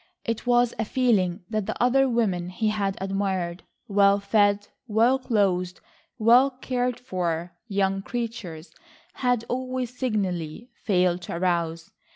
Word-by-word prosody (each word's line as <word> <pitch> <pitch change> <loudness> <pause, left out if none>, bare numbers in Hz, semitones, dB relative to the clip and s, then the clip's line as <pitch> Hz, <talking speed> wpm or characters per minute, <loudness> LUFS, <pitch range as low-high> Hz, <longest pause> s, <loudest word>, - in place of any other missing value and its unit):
It 230 +1 -3
was 245 -1 +3
a - - +2
feeling 210 -8 +1
that 215 -2 -2
the - - -4
other 265 +2 +3
women 195 -7 0
he 215 +4 -1
had 200 -2 -1
admired—well 195 +1 0
fed, 205 0 +2 0.2
well 230 +4 +3
clothed, 190 -7 0 0.4
well 240 +5 +6
cared 250 -2 -2
for 175 -5 -3
young 195 -2 0
creatures—had 230 +2 -4
always 255 -1 -3
signally 210 - -2
failed 180 -5 +1
to 170 - -6
arouse. 170 -2 -1
205 Hz, 120 wpm, -25 LUFS, 180-240 Hz, 0.4 s, well